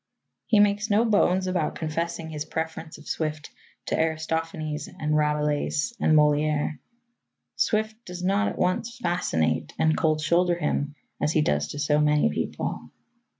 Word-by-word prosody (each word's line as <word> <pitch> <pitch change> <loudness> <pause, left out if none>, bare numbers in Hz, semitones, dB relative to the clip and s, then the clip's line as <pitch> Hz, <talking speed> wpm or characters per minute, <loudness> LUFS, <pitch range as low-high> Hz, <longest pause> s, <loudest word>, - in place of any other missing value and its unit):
He 220 -4 +4
makes 205 +1 +3
no 215 +3 +4
bones 190 -4 +3
about 180 -4 -1
confessing 165 0 -3
his 150 -1 -3
preference 160 0 -5
of - - -15
Swift 155 -1 -3 0.3
to - - -1
Aristophanes 160 -1 -2
and 155 -4 -2
Rabelais 150 +5 +1
and 155 - +4
Molière. 150 0 +2 0.8
Swift 220 +1 0
does 180 -2 -7
not 200 +3 +2
at - - -4
once 220 +7 0
fascinate 80 - 0
and 155 0 +3
cold 155 -1 +1
shoulder 175 +3 +2
him 150 -3 -1 0.3
as 150 - +1
he 155 - +3
does 75 - +1
to - - -7
so 150 0 +2
many 150 - +3
people. - - -3
160 Hz, 150 wpm, -26 LUFS, 150-180 Hz, 0.8 s, He